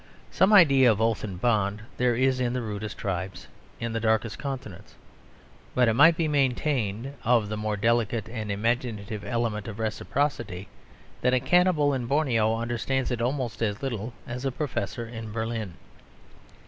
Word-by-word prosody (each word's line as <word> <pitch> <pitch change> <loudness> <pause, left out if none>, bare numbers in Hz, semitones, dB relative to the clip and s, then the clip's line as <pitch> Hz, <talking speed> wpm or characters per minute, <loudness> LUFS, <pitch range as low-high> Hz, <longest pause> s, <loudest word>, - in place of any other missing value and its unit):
Some 190 +2 +3
idea 140 - +7
of 105 - -1
oath 115 -1 +1
and 95 -4 -5
bond 105 -2 +1
there 125 -1 +2
is 130 +1 +2
in 125 -1 0
the 125 - -1
rudest 105 -1 -5
tribes, 95 -1 -4 0.3
in 115 -1 -3
the 115 - -1
darkest 110 0 0
continents. 130 - -7 0.8
But 125 -1 +4
it 115 - +3
might 160 +7 +6
be 165 - +1
maintained, 135 -4 0
of 115 -3 +3
the 110 - -2
more 105 0 -2
delicate 115 +1 +1
and 110 -2 -4
imaginative 110 -1 -2
element 115 -4 -2
of 110 -2 -6
reciprocity, 110 -3 -2 0.5
that 125 0 +3
a - - +3
cannibal 175 -2 +3
in 125 -3 -2
Borneo 120 -6 +2
understands 120 +3 -1
it 120 -1 -2
almost 125 -1 -2
as 105 +2 -1
little 115 -3 -3
as 125 +2 -6
a 135 - 0
professor 125 -3 -3
in 115 -2 -7
Berlin. 110 -4 -3
115 Hz, 160 wpm, -26 LUFS, 110-130 Hz, 0.8 s, idea